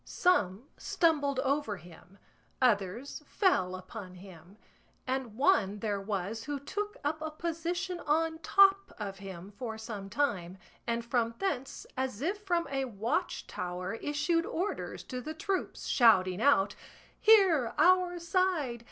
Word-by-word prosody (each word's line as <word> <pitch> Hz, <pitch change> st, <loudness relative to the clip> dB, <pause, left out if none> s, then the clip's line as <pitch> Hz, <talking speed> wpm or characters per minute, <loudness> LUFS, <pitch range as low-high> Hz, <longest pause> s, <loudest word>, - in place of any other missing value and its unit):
Some 220 Hz, -, +1 dB
stumbled 285 Hz, -5 st, +1 dB
over 275 Hz, -6 st, 0 dB
him, 175 Hz, +3 st, -16 dB, 0.4 s
others 230 Hz, +3 st, +1 dB
fell 185 Hz, -, +2 dB
upon 185 Hz, 0 st, -9 dB
him, 180 Hz, 0 st, -14 dB, 0.5 s
and 255 Hz, -4 st, -3 dB
one 225 Hz, -, +3 dB
there 205 Hz, -1 st, -2 dB
was 205 Hz, +2 st, -3 dB
who 290 Hz, 0 st, -3 dB
took 415 Hz, -, -4 dB
up 305 Hz, +2 st, -1 dB
a 315 Hz, -, -2 dB
position 340 Hz, +3 st, -3 dB
on 320 Hz, +1 st, 0 dB
top 390 Hz, +2 st, +4 dB
of 195 Hz, -3 st, -5 dB
him 190 Hz, -1 st, -9 dB
for 220 Hz, +1 st, -6 dB
some 215 Hz, -3 st, -7 dB
time, 195 Hz, -8 st, -1 dB, 0.3 s
and 235 Hz, 0 st, -1 dB
from 235 Hz, -1 st, 0 dB
thence 275 Hz, -9 st, -3 dB
as 260 Hz, -5 st, -2 dB
if 375 Hz, +9 st, -2 dB
from 350 Hz, -4 st, 0 dB
a 270 Hz, -1 st, 0 dB
watchtower 190 Hz, -4 st, -3 dB
issued 300 Hz, +7 st, 0 dB
orders 370 Hz, +5 st, -3 dB
to 255 Hz, -1 st, -5 dB
the 310 Hz, +4 st, -6 dB
troops, 380 Hz, +4 st, -3 dB
shouting 190 Hz, -6 st, +4 dB
out, 205 Hz, -8 st, +4 dB, 0.5 s
"Here, 370 Hz, -, +5 dB
our 355 Hz, +2 st, +4 dB
side! 340 Hz, -7 st, 0 dB
260 Hz, 135 wpm, -31 LUFS, 200-330 Hz, 0.5 s, Here